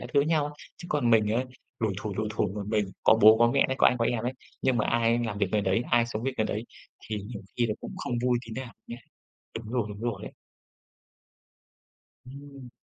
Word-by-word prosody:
các - - -6
thứ 140 - +6
với 145 - 0
nhau, 150 -2 +1 0.2
chứ 175 - -10
còn 140 -6 +2
mình 110 -2 +4
ấy, 125 +3 +1 0.4
lủi 110 -3 +1
thủi, 105 -1 -4
lủi 110 0 -1
thủi 110 -1 0
một 105 - -3
mình, 105 -2 +1 0.2
có - - +7
bố 110 +1 +9
có 120 - +6
mẹ 140 - +3
ấy, 130 - -1
có - - +6
anh 125 - +3
có 115 - +2
em 120 -1 0
ấy, 125 - -1 0.3
nhưng 130 -2 +2
mà 105 - +1
ai 115 0 +2
làm 115 -4 -3
việc 100 - +2
người 105 - +3
đấy, 100 +4 +1
ai 120 0 +4
sống 110 -2 -4
việc 135 +1 -1
người 110 - +2
đấy 105 +2 -3 0.4
thì 110 - -2
nhiều 105 -1 -8
khi 120 -1 +2
là 105 - -1
cũng - - -7
không - - -4
vui 125 -1 +3
tí 115 - -8
nào 120 - -10
nhé. 120 - -7 0.6
Đúng 115 0 -9
rồi, 125 -3 +1
đúng 105 0 -8
rồi 115 -4 -3
ấy. - - -8 1.9
Ừm. 140 -1 -11
115 Hz, 245 wpm, -28 LUFS, 110-125 Hz, 1.9 s, bố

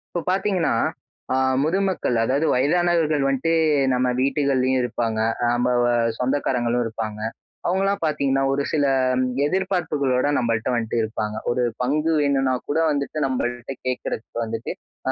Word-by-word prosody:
இப்ப 175 - 0
பார்த்தீங்கன்னா, 190 -3 +1 0.6
ஆ - - +2 0.3
முதுமக்கள் 185 -5 0
அதாவது 140 +6 +1
வயதானவர்கள் 155 +2 +2
வந்துட்டு 135 +4 0 0.4
நம்ம 125 0 +1
வீட்டுகள்லயும் 135 -2 +1
இருப்பாங்க. 115 -2 -2 0.2
அ - - +3
நம்ப 120 +1 +1
வ - - +3 0.3
சொந்தக்காரங்களும் 125 -2 0
இருப்பாங்க. 110 -1 -5 0.5
அவங்களலாம் 195 +2 +1
பார்த்தீங்கன்னா 135 -3 +1
ஒரு 140 - 0
சில 145 -2 +2 0.6
எதிர்பார்ப்புகளோட 150 -7 0
நம்மள்ட்ட 115 0 0
வந்துட்டு 115 -1 -2
இருப்பாங்க. 110 -1 -3
ஒரு 125 +1 +1 0.2
பங்கு 150 +6 +1
வேணும்னா 135 -2 +2 0.2
கூட 150 - +1
வந்துட்டு 140 +1 -2
நம்மள்ட்ட 120 0 -3
கேட்கறதுக்கு 125 -2 -4
வந்துட்டு, 115 0 -4 0.4
ஆ - - +3
135 Hz, 125 wpm, -23 LUFS, 120-155 Hz, 0.6 s, அ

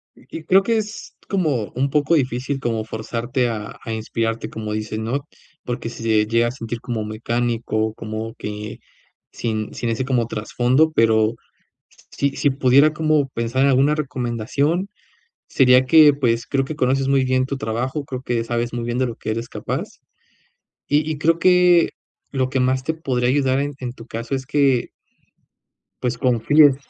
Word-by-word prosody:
Y - - -20
y - - -14
creo 190 +3 +5
que 230 +2 +1
es 215 0 -5
como 150 - 0
un 135 +3 +1
poco 150 +4 +2
difícil 135 0 -1
como 115 -2 -1
forzarte 120 +3 -2
a 105 -1 -6
a 115 - -5
inspirarte, 115 +1 -2
como 110 -1 -5
dices, 110 0 -3
¿no?, 130 +6 -3 0.4
porque 120 -1 -4
sí 115 - -9
se 110 -2 +3
llega 115 +1 +2
a - - -2
sentir 115 -2 -6
como 120 -4 -3
mecánico, 110 0 -1
como 110 +1 -5
que 105 0 -6 0.5
sin 110 -2 -3
sin 120 - -3
ese 115 +3 -1
como 125 -4 +1
trasfondo, 125 +8 +1
pero 110 -1 +3 0.6
s - - -24
si 140 - 0
si 145 - +3
pudiera 135 +3 +4
como 155 -2 +1
pensar 120 +2 -1
en 140 - +4
alguna 135 +3 +3
recomendación, 140 - -1 0.6
sería 130 -1 +5
que, 155 0 +7
pues, 115 -4 0
creo 135 -1 0
que 150 +3 -6
conoces 135 0 +1
muy 135 -1 +3
bien 130 0 +1
tu 140 - -3
trabajo, 130 +4 -3
creo 130 -1 -6
que 120 -3 -1
sabes 120 0 -2
muy 120 - -3
bien 120 +1 -2
de 130 - +2
lo 115 -2 -5
que - - -5
eres 115 +2 -3
capaz, - - -3 1.0
y 150 +2 +2
y 155 - -3
creo 165 +2 +2
que 180 -1 +5 0.4
lo 130 -2 0
que 135 - 0
más 130 +1 +1
te 160 - -1
podría 130 -6 -1
ayudar 135 0 +2
en 145 0 -2
en 125 -2 -5
tu 115 -2 -13
caso, 115 +3 -4
es 130 -1 -3
que 135 -3 +2 1.1
pues, 125 -1 -1
confíes 135 +4 +4
125 Hz, 180 wpm, -21 LUFS, 115-140 Hz, 1.1 s, que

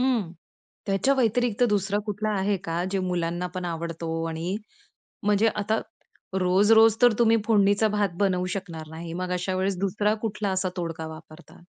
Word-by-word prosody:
हं, 240 -9 +1 0.5
त्याच्या 195 +7 +2
वैतिरिक्त 245 -2 +1
दुसरा 205 0 +1
कुठला 215 +1 -2
आहे 195 +1 +1
का? 170 +1 -2
जे 195 - 0
मुलांना 175 0 -1
पण 180 - -3
आवडतो 165 -1 -4 0.2
आणि 165 +5 -3 0.7
म्हणजे 210 +2 +4
आता 215 +2 0 0.6
रोज-रोज 210 +4 +5
तर 245 -2 +7
तुम्ही 230 -1 +5
फोडणीचा 205 0 +4
भात 205 -2 0
बनवू 185 -2 +1
शकणार 165 -5 -7
नाही. 165 +1 -7
मग 180 +1 -4
अशा 185 +1 -2
वेळेस 190 0 0
2रा 205 +2 +1
कुठला 210 -2 -2
असा 190 0 0
तोडगा 165 -2 -4
वापरता? 160 +1 -15
195 Hz, 155 wpm, -26 LUFS, 175-210 Hz, 0.7 s, तर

